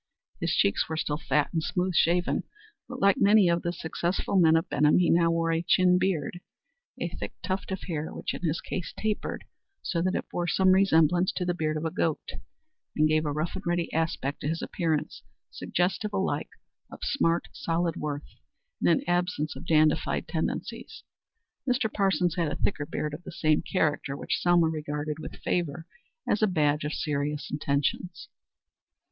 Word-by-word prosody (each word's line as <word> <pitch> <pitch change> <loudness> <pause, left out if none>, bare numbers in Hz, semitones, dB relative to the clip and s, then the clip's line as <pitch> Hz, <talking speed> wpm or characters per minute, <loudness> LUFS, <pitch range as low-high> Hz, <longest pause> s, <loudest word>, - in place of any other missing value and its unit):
His - - 0
cheeks 100 - +2
were 160 - -2
still 150 -1 -1
fat 150 -1 0
and 165 - +1
smooth 180 +2 -1
shaven, 175 +2 +2 0.5
but, 255 0 -6
like 200 -1 +4
many 205 -1 +6
of 170 0 +2
the 175 - -1
successful 175 +3 -2
men 165 -4 +6
of 165 - +1
Benham, 150 +1 +3
he 180 -1 +3
now 170 0 +4
wore 165 0 +1
a 165 0 +1
chin 180 +1 +4
beard 175 -3 -1 0.6
a - - -2
thick - - -6
tuft 190 +1 -3
of 190 - -3
hair 160 -3 -3
which - - -4
in - - -6
his 165 -2 -1
case 175 -4 -5
tapered 215 -1 -2 0.4
so 170 - -1
that 185 +2 0
it - - -3
bore 175 0 -2
some 190 +2 +4
resemblance 180 -2 +4
to 180 - -2
the 175 - +1
beard 155 -2 -1
of 155 - -4
a 160 - -1
goat, 160 -1 -1 0.6
and 155 0 +4
gave 155 0 +1
a - - 0
rough 155 +3 -2
and 190 - -6
ready 175 -1 -1
aspect 160 -3 -1
to - - -2
his 165 +2 -2
appearance 160 -4 -2 0.3
suggestive 190 +4 -1
alike 195 -1 -1 0.4
of - - -11
smart, 170 -11 +1
solid 170 0 -1
worth 145 -1 -5 0.4
and - - +2
an 275 - +3
absence 175 -3 0
of - - -10
dandified 155 -1 +2
tendencies. - - -4 0.7
Mr. 245 -3 +1
Parsons 190 -4 +2
had 165 -4 +1
a - - -2
thicker 145 -7 -1
beard 150 0 -3
of 155 - -6
the - - -9
same 155 -2 +2
character, 145 -6 -1
which - - -2
Selma 175 -1 +4
regarded 150 -1 -3
with - - -7
favor 165 -2 -1 0.4
as 210 - +1
a 215 - +5
badge 150 -5 +1
of 150 - -2
serious 150 0 -2
intentions. 145 +4 -2
165 Hz, 180 wpm, -27 LUFS, 155-180 Hz, 0.7 s, many